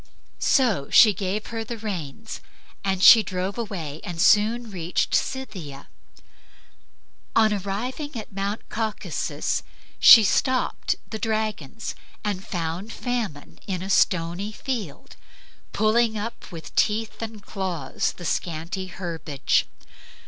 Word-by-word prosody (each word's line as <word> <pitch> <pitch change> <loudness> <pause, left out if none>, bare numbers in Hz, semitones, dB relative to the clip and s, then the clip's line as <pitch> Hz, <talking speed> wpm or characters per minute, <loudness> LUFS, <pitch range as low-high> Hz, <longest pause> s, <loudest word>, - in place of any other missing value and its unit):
So 225 - +2
she 215 -3 +7
gave 195 +2 -3
her 225 0 -2
the 235 +1 -6
reins, 210 -1 -6 0.4
and 190 -1 0
she 225 - +10
drove 185 -1 -3
away 170 -10 -5
and 175 -2 -6
soon 220 +4 +4
reached 175 -2 -1
Scythia. 180 - -3 1.5
On 220 -1 +5
arriving 235 +9 -4
at 215 - -8
Mount 200 +2 -3
Caucasus 220 -1 -2 0.4
she 225 - +10
stopped 255 +5 +1 0.2
the 220 - -4
dragons 220 - -2 0.3
and 200 -3 -2
found 175 +4 -4
Famine 230 - -4
in 185 -2 -2
a 195 - -3
stony 180 +3 +1
field, 215 - -5 0.5
pulling 220 +1 +2
up 220 +1 -6
with 165 -2 -9
teeth 220 +1 +1
and 220 -2 -6
claws 180 -9 -2
the 175 - -10
scanty 170 +4 -2
herbage. 165 -6 -1
200 Hz, 115 wpm, -24 LUFS, 175-225 Hz, 1.5 s, she